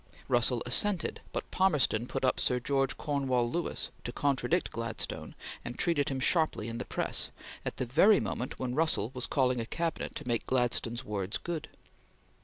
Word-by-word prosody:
Russell -, -, +3 dB
assented, 205 Hz, -5 st, +3 dB
but -, -, -4 dB
Palmerston 150 Hz, -, +2 dB
put 135 Hz, 0 st, -1 dB
up 130 Hz, -, +2 dB
Sir 125 Hz, -, +2 dB
George 135 Hz, +1 st, 0 dB
Cornewall 135 Hz, -5 st, 0 dB
Lewis 175 Hz, +4 st, -2 dB
to 120 Hz, -, -4 dB
contradict 145 Hz, +7 st, +1 dB
Gladstone 115 Hz, -1 st, -4 dB, 0.3 s
and 120 Hz, -, -6 dB
treated 160 Hz, -3 st, +2 dB
him 135 Hz, -1 st, -2 dB
sharply 155 Hz, -6 st, +2 dB
in 115 Hz, +1 st, -5 dB
the -, -, -4 dB
press, -, -, 0 dB, 0.3 s
at -, -, -4 dB
the 130 Hz, -, -1 dB
very 175 Hz, -, +5 dB
moment 125 Hz, -, -3 dB
when 125 Hz, -1 st, -3 dB
Russell 140 Hz, -7 st, +2 dB
was 125 Hz, -1 st, -3 dB
calling 130 Hz, -3 st, +2 dB
a -, -, -3 dB
Cabinet 165 Hz, +4 st, -2 dB
to 150 Hz, -, -6 dB
make 120 Hz, -2 st, -1 dB
Gladstone's 120 Hz, -2 st, 0 dB
words 100 Hz, -2 st, -2 dB
good. 170 Hz, -2 st, -5 dB
130 Hz, 170 wpm, -31 LUFS, 120-155 Hz, 0.3 s, very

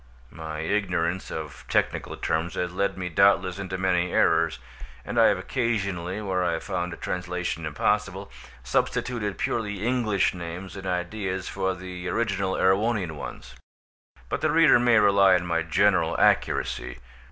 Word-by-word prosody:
My 80 Hz, -1 st, -6 dB
ignorance 90 Hz, -1 st, -1 dB
of 75 Hz, -2 st, -7 dB
technical -, -, 0 dB
terms 80 Hz, +2 st, -1 dB
has 90 Hz, 0 st, -2 dB
led 100 Hz, +1 st, -1 dB
me 90 Hz, -1 st, -3 dB
doubtless 95 Hz, 0 st, +3 dB
into 95 Hz, -1 st, -4 dB
many 90 Hz, -1 st, +1 dB
errors, 80 Hz, -5 st, +2 dB, 0.5 s
and -, -, -1 dB
I -, -, +7 dB
have -, -, +3 dB
occasionally, 100 Hz, -7 st, -2 dB
where 95 Hz, -2 st, 0 dB
I 85 Hz, -2 st, 0 dB
found 90 Hz, -1 st, -4 dB
translation 90 Hz, -2 st, -3 dB
impossible, 75 Hz, -3 st, -1 dB, 0.3 s
substituted 105 Hz, -, -1 dB
purely 105 Hz, -3 st, -2 dB
English 115 Hz, -6 st, +1 dB
names 90 Hz, +2 st, -7 dB
and 95 Hz, -1 st, -7 dB
ideas 95 Hz, +1 st, -3 dB
for 95 Hz, -1 st, -1 dB
the 90 Hz, 0 st, -7 dB
original 100 Hz, -4 st, -1 dB
Erewhonian 100 Hz, -1 st, +1 dB
ones, 70 Hz, -, -8 dB, 0.7 s
but -, -, -3 dB
the -, -, +2 dB
reader 160 Hz, -6 st, +6 dB
may 120 Hz, -1 st, +4 dB
rely 100 Hz, -2 st, +5 dB
on 90 Hz, 0 st, 0 dB
my 85 Hz, -1 st, 0 dB
general 80 Hz, -1 st, +2 dB
accuracy. -, -, +1 dB
95 Hz, 140 wpm, -26 LUFS, 85-100 Hz, 0.7 s, I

